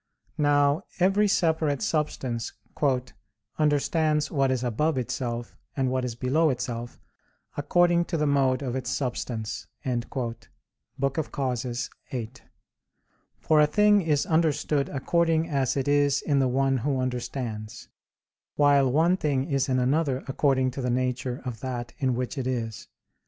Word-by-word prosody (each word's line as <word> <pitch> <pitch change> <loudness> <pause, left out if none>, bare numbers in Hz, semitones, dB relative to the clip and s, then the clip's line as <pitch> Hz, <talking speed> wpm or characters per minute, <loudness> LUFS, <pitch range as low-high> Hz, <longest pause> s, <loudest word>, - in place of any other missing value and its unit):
Now, 145 +1 +3 0.2
every 195 +3 +4
separate 160 -4 +1
substance 135 - -2 1.1
"understands 150 +1 +1
what 135 -3 +2
is 130 -1 0
above 135 +6 0
itself 120 -1 -3 0.2
and 130 -2 +1
what 130 0 0
is 125 -2 -3
below 140 +7 +2
itself, 120 -2 -4 0.6
according 175 +4 +3
to 170 - -2
the 150 - +1
mode 135 -2 +2
of 125 -2 -3
its 130 -3 -3
substance" 115 0 -3 0.2
(De 125 -2 0 1.0
Causis 130 -3 -2 0.2
viii): 120 -3 -4 1.1
for 155 -1 +3
a 150 - +5
thing 210 +5 +4
is 150 -4 +1
understood 155 -3 +1
according 165 +3 +1
as 140 -4 0
it 135 - -1
is 145 -1 +3
in 145 -3 +2
the 135 - +3
one 135 +1 +2
who 135 +2 -1
understands; 120 -3 -4 0.7
while 140 -3 +4
one 165 +6 +3
thing 145 -7 0
is 140 -4 0
in 130 - +2
another 135 +1 +1
according 135 -1 +1
to 135 - -5
the 125 - -1
nature 125 0 -1
of 120 -4 -5
that 125 -1 -5
in 130 -4 +1
which 125 +3 -3
it 130 - -2
is. 115 -4 -3
135 Hz, 140 wpm, -26 LUFS, 125-150 Hz, 1.1 s, a